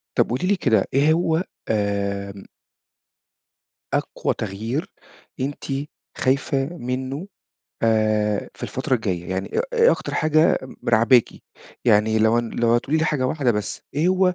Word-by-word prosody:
طَب - - +3
قولي 130 +10 -1
لي 205 - +3
كده 110 - +2
إيه 145 +4 +4
هو 165 0 +1 0.3
آمم 100 -2 -2 1.5
أقوى - - -1
تغيير 110 - -4 0.5
أنتِ 140 +2 -3 0.5
خايفة 135 +1 +1
منّه 130 +6 -4 0.6
آآ، 110 -2 +1
في - - -16
الفترة 130 - -1
الجاية، 95 -7 -2
يعني 95 +1 -3
إيه - - +1
إيه 475 0 +5
أكتر - - -4
حاجة 155 +1 +3
م 130 - -9
راعباكِ؟ 115 +1 +5 0.6
يعني 110 -1 +4
لو 110 +2 +4
ن 120 -1 -2
لو 115 0 +2
هتقولي 135 +6 +1
لي 160 - +1
حاجة 140 -5 0
واحدة 135 -2 +1
بس، 105 -2 -4
إيه 155 +5 +2
هو 185 0 +3
120 Hz, 140 wpm, -22 LUFS, 110-150 Hz, 1.5 s, إيه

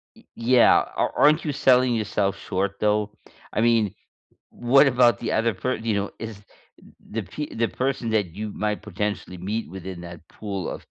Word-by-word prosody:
Ye - - -20
yeah. 120 +1 +5 0.2
Ar - - 0
aren't 155 +2 +4
you 150 - -1
selling 130 -3 +4
yourself 105 -3 0
short, 100 +2 -3
though? 105 0 +1 0.4
I 110 - 0
mean, 115 -4 +2 0.6
what 135 +4 +4
about 120 -4 +4
the 120 - -3
other 115 -1 +1
per 125 +7 -2
you 110 -1 -2
know, 100 0 -1
is 110 -2 -7 0.7
the 110 0 -2
p 145 - -6
the 115 0 +1
person 130 -3 -2
that 110 -3 +2
you 105 0 -5
might 105 0 -2
potentially 105 -2 -4
meet 105 +4 -3
within 95 -1 -7
that 85 -1 -10
pool 100 -4 -5
of - - -8
110 Hz, 175 wpm, -24 LUFS, 100-120 Hz, 0.7 s, yeah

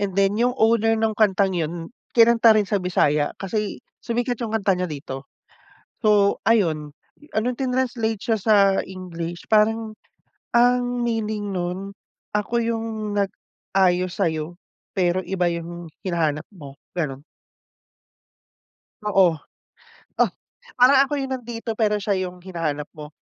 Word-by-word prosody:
and 195 -2 -2
then 195 0 +3
'yung 245 +1 +2
owner 225 0 +3
nung 220 0 +1
kantang 200 -2 +3
'yun, 165 +3 -3 0.2
kinanta 230 -1 +6
rin 210 - +3
sa 205 -3 +1
Bisaya, 150 -5 +1
kasi 210 +1 -3 0.2
sumikat 245 +1 -2
'yung 225 -2 -3
kanta 200 -2 +2
niya 180 0 -2
dito. 140 -3 -7 0.7
So 205 -2 +4
ayun, 160 -10 +2 0.4
ah, 215 - +2
nong 245 0 -2
trinanslate 250 -5 -1
siya 225 -3 +1
sa 215 +1 +4 0.3
English 175 -2 -7
parang 220 0 +2 0.6
ang 245 +1 +5 0.2
meaning 215 -3 -2
nun, 180 0 -2 0.6
ako 210 +3 0
'yung 225 0 -1 0.3
nag-ayos 185 -2 0
sa'yo 165 -1 -1 0.4
pero 185 -1 +1
iba 185 -2 0
'yung 170 0 -6 0.2
hinahanap 160 -5 0
mo, 145 -8 -11 0.2
gano'n. 145 -6 -3 1.8
Oo. 195 -5 +4 0.9
Oh, - - +4 0.5
parang 260 +2 +7
ako 280 - -4
'yung 270 -1 -2
nandito 230 -2 -5
pero 210 -2 +1
siya 200 0 0
'yung 180 -1 -4
hinahanap 165 -5 -3
mo, 150 -1 -9
200 Hz, 130 wpm, -23 LUFS, 175-225 Hz, 1.8 s, parang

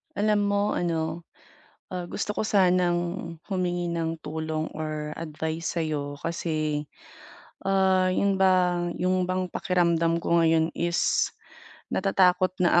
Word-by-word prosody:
Alam 205 0 +2
mo 200 0 +1
ano, 165 -1 -2 0.7
ah, 180 - -2
gusto 210 -1 -3
ko - - -1
sanang 180 -4 +3 0.5
humingi 175 -3 -1
ng 165 0 -2
tulong 155 0 -2
or 155 -1 -4
advice 160 0 -4
sa'yo 145 -3 -2
kasi, 155 -2 -2 0.8
ah, 190 -1 +3
'yun 195 +2 +2
bang 180 -2 +3
yung 185 +1 +1
bang 185 0 -1
pakiramdam 170 -2 +1
ko 170 -1 +3
ngayon 160 0 +3
is 170 0 +1 0.6
natatakot 185 -1 +3
na 175 0 +5
175 Hz, 115 wpm, -26 LUFS, 160-185 Hz, 0.8 s, na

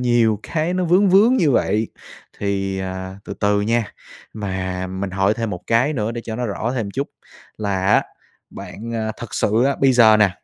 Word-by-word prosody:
nhiều 120 -3 +2
cái 165 +2 -1
nó 185 - 0
vướng 185 +4 +4
vướng 215 +7 +5
như 160 - +3
vậy, 110 -3 +1 0.5
thì, 95 -1 -2
à, 95 0 -5
từ - - -6
từ 105 0 +1
nha. 115 -1 0 0.4
Mà 95 -3 -3
mình 95 +1 -4
hỏi 95 +2 +1
thêm 115 -1 -3
một 90 -2 -5
cái 125 +6 +2
nữa 110 -3 -2
để 120 - -4
cho 110 -1 -5
nó 125 - -2
rõ 110 +3 -2
thêm 115 -4 -1
một - - -6
chút 140 +2 -2 0.5
là 95 -3 -1
á, 100 - +4 0.5
bạn, 115 +3 -8
a, 110 -1 -2
thực 120 - -7
sự 110 +4 +2
á, 140 +1 +1
bây 135 -1 +5
giờ 110 -3 +6
nè, 105 -3 +4
110 Hz, 205 wpm, -20 LUFS, 100-125 Hz, 0.5 s, giờ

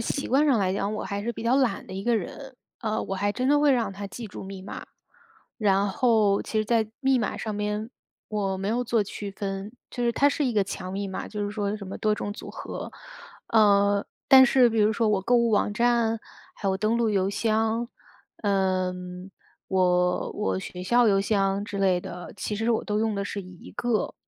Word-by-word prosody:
习 275 +4 -2
惯 275 +4 +3
上 265 -6 +4
来 190 -2 +1
讲， 200 +2 -1
我 215 - -4
还 200 0 -3
是 235 - -2
比 225 - -7
较 235 +2 +2
懒 250 -8 +1
的 - - -9
一 190 +1 -4
个 235 +2 +2
人， 260 +6 -6 0.2
呃， 220 -2 -1
我 195 - -4
还 205 +2 0
真 250 +4 -2
的 290 +2 +4
会 295 -1 +5
让 235 -5 0
它 200 +1 -6
记 230 +4 -7
住 200 - -9
密 190 -1 -8
码。 195 - -8 0.7
然 200 -2 +2
后 215 -2 +3
其 220 - -2
实 215 - +1
在 225 -1 +1
密 265 -2 +3
码 215 - -2
上 215 -2 -4
面， 210 +2 -2 0.4
我 195 -3 -1
没 195 +2 -3
有 240 +3 +1
做 230 -2 +2
区 200 0 -6
分。 195 +1 -5 0.2
就 245 - -4
是 235 - +3
它 285 +5 +4
是 295 - -1
一 250 - 0
个 205 -2 +3
强 185 -1 -6
密 200 +1 -3
码， 190 - -5
就 210 -1 -3
是 205 - -3
说 205 0 -2
什 200 -2 -8
么 190 - -6
多 215 -1 +2
种 205 -1 -4
组 - - -9
合。 - - -7 0.6
呃， 200 -2 +4 0.2
但 265 -1 +9
是 250 -1 +5
比 225 - -1
如 210 +1 +4
说 225 +1 +1
我 205 -2 +2
购 245 +5 +3
物 235 -1 +3
网 210 -1 +2
站， 235 -1 +2 0.4
还 200 - -5
有 190 - +2
登 215 +3 +1
陆 235 -2 +2
邮 195 -2 +1
箱， 225 +2 0 0.6
呃， 190 -3 +1 0.8
我 180 -1 +2
我 210 -2 -1
学 180 -1 -7
校 240 +5 +4
邮 195 -1 +3
箱 195 -1 +1
之 205 - -5
类 190 -2 +3
的， 175 0 -8
其 210 +2 -3
实 225 +2 0
我 225 - +1
都 210 0 -1
用 220 -1 0
的 200 - -1
是 200 0 -4
一 185 -1 -12
个， 235 -1 -1
210 Hz, 235 characters per minute, -26 LUFS, 195-230 Hz, 0.8 s, 但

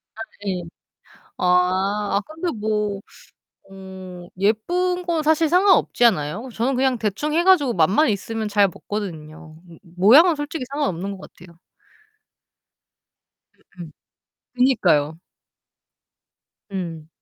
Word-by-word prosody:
아 220 - -9 0.2
네. 185 -3 -3 0.7
아. 190 +3 +1
아 - - +2
근데 325 +3 -4
뭐 210 -2 -2 0.7
어 190 -2 -11
예쁜 350 - 0
건 335 -3 -1
사실 315 +1 +2
상관없지 365 -8 +3
않아요? 200 - 0
저는 245 +5 -1
그냥 260 -1 +1
대충 220 +8 -2
해 335 +2 +2
가지고 335 -10 +4
맛만 190 - +3
있으면 220 +2 -3
잘 205 -1 +3
먹거든요. 160 -5 -7
므 165 - -15 0.2
모양은 285 - +6
솔직히 290 0 -5
상관없는 200 - -2
것 - - -13
같아요. 170 -1 -17 2.2
으음. 165 -3 -8 0.6
그니까요. 175 - +2 1.5
음. 165 -5 -6
210 Hz, 215 characters per minute, -21 LUFS, 180-285 Hz, 2.2 s, 모양은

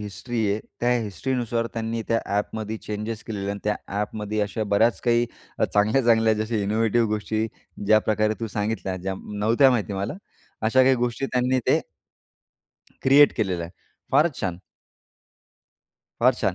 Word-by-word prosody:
History 105 +4 -5
आहे 105 - 0 0.2
त्या 120 +1 +2
हिस्ट्रीनुसार 115 +3 -2
त्यांनी 115 0 -2
त्या 115 0 +2 0.2
ॲपमध्ये 110 +1 -3
चेंजेस 105 +1 -4
केलेले 100 -3 -4
आणि 100 - -4
त्या 105 - +1 0.2
ॲपमध्ये 105 0 -3
अशा 105 +2 -1
बऱ्याच 115 +3 +3
काही 120 0 +3 0.3
अ, - - +3
चांगल्या, 110 +6 +2
चांगल्या 110 -1 +4
जशा 115 0 -2
इनोवेटिव्ह 110 +2 +1
गोष्टी 110 +1 -1 0.4
ज्याप्रकारे 110 0 +3
तू 115 - -1
सांगितल्या 105 -3 -2
ज्या 95 +1 -3 0.2
नव्हत्या 115 +6 +5
माहिती 110 -4 0
मला 100 +3 -3 0.5
अशा 130 +4 +4
काही 130 0 +5
गोष्टी 120 +2 -1
त्यांनी 130 0 +1
ते - - +4 1.2
क्रिएट 140 +2 +6
केलेलं 95 -6 -1
आहे. 85 - -7 0.4
फारच 150 +1 +4
छान. 90 -3 -2 1.6
फार 125 +1 +5
छान. 100 -6 -1
110 Hz, 145 wpm, -24 LUFS, 105-120 Hz, 1.6 s, क्रिएट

